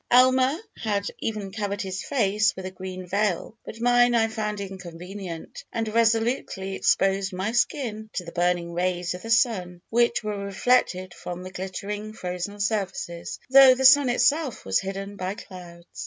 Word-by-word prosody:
Almer 255 +3 +5 0.2
had 205 -3 -1
even 210 -3 -3
covered 205 -1 -3
his 190 0 -4
face 210 -5 +1
with 190 - -7
a 185 - -5
green 185 0 -7
veil, 200 +2 -1
but 225 - -9
mine 245 0 +4
I 225 -1 +3
found 210 -2 -3
inconvenient, 185 -2 -8
and 225 -1 -2
resolutely 225 -4 +1
exposed 195 0 +1
my 190 +4 -2
skin 230 -3 -1
to 180 - -3
the 170 - -8
burning 175 0 0
rays 175 0 -1
of 180 - -8
the 225 - -8
sun, 200 -7 +2
which 235 0 +2
were 210 -1 -3
reflected 195 -3 +1
from 180 +1 -7
the 185 - -8
glittering 200 +3 -5
frozen 180 +1 -5
surfaces, 200 -3 -2
though 265 -1 +9
the 265 +1 0
sun 280 -1 +8
itself 260 +3 +1
was 95 0 +2
hidden 195 +1 -5
by 185 +1 -3
clouds. 175 -4 -11
200 Hz, 160 wpm, -25 LUFS, 185-230 Hz, 0.2 s, though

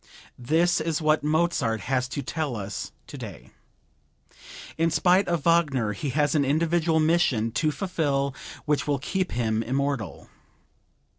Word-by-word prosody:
This 165 +7 +2
is 160 -1 -1
what 155 -2 +2
Mozart 150 -8 +1
has 130 -1 0
to 140 +2 -4
tell 150 -2 -3
us 100 -2 -5
today. - - -9 1.2
In 165 +1 +2
spite 180 +5 +3
of 170 -4 0
Wagner 145 -10 +2
he 140 +7 -4
has 145 +2 +1
an 150 -3 +3
individual 160 +3 +2
mission 155 -9 +2
to 155 +6 +1
fulfill 145 -6 -1 0.3
which 150 -1 0
will 145 -1 +1
keep 185 +7 -2
him 110 -2 0
immortal. 135 -1 -2
150 Hz, 135 wpm, -26 LUFS, 130-165 Hz, 1.2 s, spite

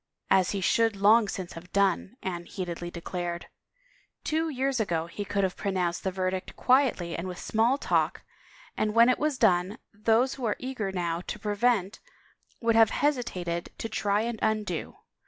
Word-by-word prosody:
" - - -49
As 180 - -3
he 200 - -2
should 225 +3 +2
long 210 +3 +5
since 185 -2 -5
have 175 +2 -11
done," 200 +3 +1
Anne 175 -2 -4
heatedly 175 -2 -5
declared. 175 0 -4 0.4
" - - -36
Two 320 +1 0
years 270 -2 -1
ago 170 -6 0
he 190 +4 -6
could 200 0 -1
have 185 -1 0
pronounced 185 -4 -1
the 190 - 0
verdict 185 0 -3
quietly 250 -10 +2
and 170 +2 -4
with 180 -1 -6
small 230 +5 +1
talk, - - 0 0.5
and 215 0 -1
when 235 +1 +7
it 255 - +2
was 300 -2 0
done, 185 -2 +2 0.2
those 225 +5 +2
who 260 - -5
are 215 - +1
eager 250 -6 -4
now 170 -2 -2
to - - -4
prevent 205 -1 0 0.6
would 230 -1 +2
have 225 -1 +6
hesitated 185 -14 -1
to - - -4
try 210 -2 0
and 230 -1 -3
undo. 215 -6 -1
205 Hz, 175 wpm, -28 LUFS, 180-230 Hz, 0.6 s, when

